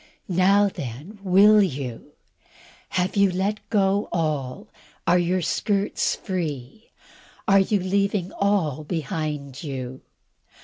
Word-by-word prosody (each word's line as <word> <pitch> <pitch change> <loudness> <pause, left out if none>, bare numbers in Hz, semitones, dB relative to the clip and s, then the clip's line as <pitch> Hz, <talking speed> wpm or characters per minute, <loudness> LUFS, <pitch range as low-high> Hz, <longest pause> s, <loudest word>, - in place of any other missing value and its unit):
Now 195 +3 +4
then, 150 - -7
will 200 +3 +6
you? 135 - -3 0.8
Have 185 +2 -1
you 200 -1 +4
let 195 +4 -1
go 200 -1 +1
all? 150 -6 -2 0.4
Are 180 - +4
your 175 +1 0
skirts 200 +4 0
free? 165 - -5 0.6
Are 195 0 +6
you 200 +1 +2
leaving 195 0 0
all 180 -8 0
behind 150 -3 -4
you? 130 -4 -6
185 Hz, 105 wpm, -24 LUFS, 150-200 Hz, 0.8 s, will